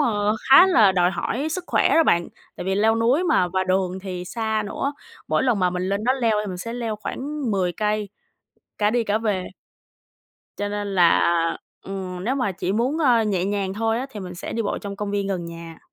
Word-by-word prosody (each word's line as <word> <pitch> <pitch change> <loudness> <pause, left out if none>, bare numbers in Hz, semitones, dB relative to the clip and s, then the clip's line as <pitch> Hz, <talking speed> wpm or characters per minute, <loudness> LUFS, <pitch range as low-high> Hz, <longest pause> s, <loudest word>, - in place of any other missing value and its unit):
ơ, 210 -6 +1 0.2
khá 310 +8 +9
là 220 - +5
đòi 180 -1 +3
hỏi 255 - -2
sức 355 +3 -4
khỏe - - +2
đó 330 - +5
bạn. 170 - +2 0.3
Tại - - -6
vì 190 0 0
leo 220 +2 +3
núi 250 +10 +2
mà 180 - +2
và 185 +1 -1
đường 185 0 0
thì 180 -2 -5
xa 220 +1 -2
nữa, 275 +7 -2 0.4
mỗi - - +2
lần 245 -5 +2
mà 180 -1 +2
mình 180 0 -3
lên 200 +2 -1
đó 255 - +3
leo 235 -5 +1
thì - - -6
mình 185 - -5
sẽ 230 +6 -5
leo 230 -3 -3
khoảng 275 +4 -4
10 185 -3 0
cây 210 +1 -1 0.7
cả 210 0 +2
đi 235 0 +1
cả 210 0 +1
về. 205 -5 -1 1.1
Cho 205 - -2
nên 205 0 -3
là, 175 -3 +5 0.6
ừm, 185 -1 -6
nếu 255 - 0
mà 250 -8 -1
chỉ 185 +1 -3
muốn, 250 +9 0
ơ, 250 -7 +4
nhẹ 195 -4 0
nhàng 195 -1 -2
thôi 225 +1 0
á 260 - -3
thì 210 - -8
mình 180 -1 -7
sẽ 175 - -6
đi 230 - -1
bộ 205 - -2
trong 200 -1 -7
công 205 0 -4
viên 200 -1 -1
gần 185 -3 -2
nhà. 165 -1 -9
205 Hz, 225 wpm, -23 LUFS, 185-230 Hz, 1.1 s, khá